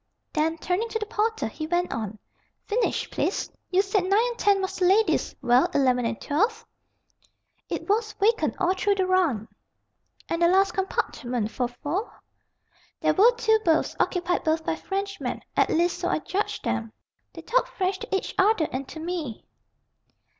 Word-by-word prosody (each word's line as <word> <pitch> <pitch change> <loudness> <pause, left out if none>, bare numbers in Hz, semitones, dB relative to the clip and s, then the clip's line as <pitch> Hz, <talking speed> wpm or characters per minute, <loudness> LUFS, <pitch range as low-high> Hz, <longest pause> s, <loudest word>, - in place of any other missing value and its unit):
Then, 320 +1 +1
turning 370 +8 -1
to 445 - -1
the 430 - -3
porter, 445 - -1
he 310 +8 -6
went 350 +2 0
on. 215 -2 -4 0.5
"Finish, 460 +3 0
please. - - -1 0.2
You 380 +1 +3
said 395 -1 +1
9 375 - -3
and 470 +4 +2
10 400 -1 +4
was 380 0 -3
the 365 - +2
lady's. 410 +4 +3
Well, 245 +1 +4
11 255 -3 +3
and 225 - -4
12?" 435 +10 0 1.0
"It - - -4
was 430 +1 +1
vacant 445 +3 +1
all 370 -1 +3
through 400 +1 +1
the 380 -1 +1
run." 340 - +1 0.8
"And 335 - -2
the 340 - +6
last 385 +2 +4
compartment, 245 - -2
for 245 - -1
four?" 300 - -4 0.8
"There - - +3
were 435 +5 +6
two 445 -2 +3
berths, 320 -2 +2
occupied 355 -1 0
both 320 0 0
by - - 0
Frenchmen, 395 +3 -4
at - - +3
least 345 +2 +1
so - - -1
I - - +1
judged 405 +3 -3
them. 225 -1 -2 0.4
They - - -10
talked - - +1
French 385 -6 -1
to 450 -3 -3
each 385 - -2
other 385 -4 +4
and 260 +1 -4
to 320 - -9
me." 320 -8 -4
370 Hz, 170 wpm, -26 LUFS, 315-415 Hz, 1.0 s, the